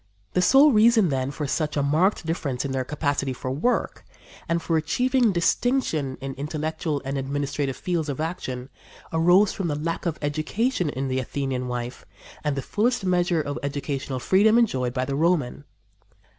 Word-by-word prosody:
The 180 - +2
sole 275 +9 +6
reason, 220 -4 +5
then, 130 -1 -1
for 145 +1 -4
such 150 +2 -1
a 140 - +2
marked 160 +7 +2
difference 145 -6 -2
in 140 - -3
their 130 -1 -1
capacity 145 -1 -1
for 130 0 -5
work 155 - -1 0.5
and 170 0 +2
for 165 0 -1
achieving 245 - +2
distinction 170 - 0
in 135 0 -5
intellectual 155 0 -3
and 135 +1 -2
administrative 140 0 -2
fields 170 -4 -2
of 140 - -4
action 135 -6 -4 0.4
arose 175 +5 +4
from 190 - -3
the 150 - -1
lack 165 +3 -3
of 165 - -2
education 160 - 0
in 135 -1 -3
the 130 0 -1
Athenian 130 -1 -3
wife 125 0 -5 0.4
and 150 -2 0
the 135 - -3
fullest 225 - 0
measure 175 -2 +2
of 145 0 -4
educational 140 -1 -3
freedom 210 - +4
enjoyed 130 - +1
by 130 0 0
the 140 - -3
Roman. 150 -3 0
150 Hz, 170 wpm, -24 LUFS, 135-180 Hz, 0.5 s, sole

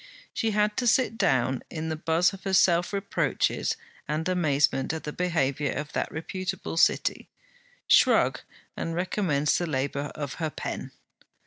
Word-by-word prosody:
She 225 - 0
had 210 0 +1
to 245 - 0
sit 245 0 +3
down 130 - +1
in 160 0 -4
the 160 - -1
buzz 165 +4 +2
of 195 - -10
her 195 -1 +1
self 175 -1 +4
reproaches 200 0 0 0.3
and 155 +3 -1
amazement 150 -5 +1
at 160 - -5
the 150 - -5
behaviour 145 -6 0
of 150 +1 -5
that - - -2
reputable 185 +3 -4
City, - - +2 0.6
shrug, - - +4 0.4
and 165 - -3
recommence 175 -5 +1
the 175 - -2
labour 140 0 -2
of 145 -2 -4
her 160 - 0
pen. - - -5
165 Hz, 150 wpm, -27 LUFS, 145-185 Hz, 0.6 s, self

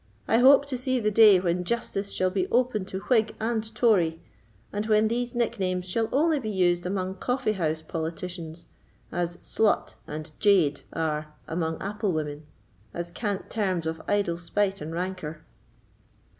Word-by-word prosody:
"I 225 - +4
hope 275 +3 +7
to 265 -3 -4
see 255 0 0
the 215 -2 +1
day 210 -3 +7
when 180 0 0
justice 200 -1 -2
shall 185 0 +1
be 185 -1 0
open 240 -5 +1
to 190 0 -5
Whig 225 -3 +2
and 225 0 0
Tory, 180 -10 +3 0.5
and 205 +1 -2
when 215 0 +4
these 240 +1 -2
nicknames 185 -6 -1
shall 225 +4 0
only 310 +2 +3
be 220 -5 -4
used 180 -3 +1
among 190 0 -2
coffee 250 -2 0
house 160 -5 -1
politicians, 165 +1 -5 0.5
as 175 0 -2
'slut' 220 -2 +1
and 155 +1 -6
'jade' 190 -9 +3
are 155 -1 -2
among 160 -1 -2
apple 205 -1 -1
women, 150 -1 -4 0.5
as 170 0 -4
cant 205 +1 -3
terms 185 -6 0
of 160 0 -3
idle 195 -5 +1
spite 195 +2 -1
and 155 +2 -5
rancour." 170 -3 -4
190 Hz, 155 wpm, -27 LUFS, 170-220 Hz, 0.5 s, hope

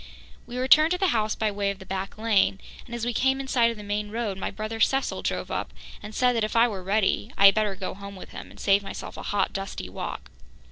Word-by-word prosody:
We 245 - -6
returned 305 +5 +6
to - - 0
the 380 -1 +2
house 215 -4 +1
by 215 -1 0
way 200 0 -1
of 200 - -3
the 190 - -12
back 190 +1 -4
lane 215 -3 +2 0.3
and, 235 - -6
as 235 -1 -3
we 240 - -1
came 265 +3 +2
in 270 - -5
sight 240 -3 +3
of 230 - -5
the 210 - -8
main 205 +1 -2
road, 220 -2 -2
my 190 - -3
brother 215 +1 -5
Cecil 270 +4 +1
drove - - -2
up - - -3 0.3
and 210 +1 -9
said 250 -1 +3
that 225 - +1
if 215 - -2
I 230 +1 +6
were 200 -5 -5
ready, 195 +2 +1
I 200 - +6
had 195 - +9
better 210 -2 0
go 190 0 -4
home 200 +1 -9
with 185 - -10
him - - -9
and - - -15
save 200 0 +4
myself 195 - -7
a - - -7
hot, 205 - 0
dusty 195 - -5
walk. - - -6
215 Hz, 265 wpm, -26 LUFS, 200-235 Hz, 0.3 s, had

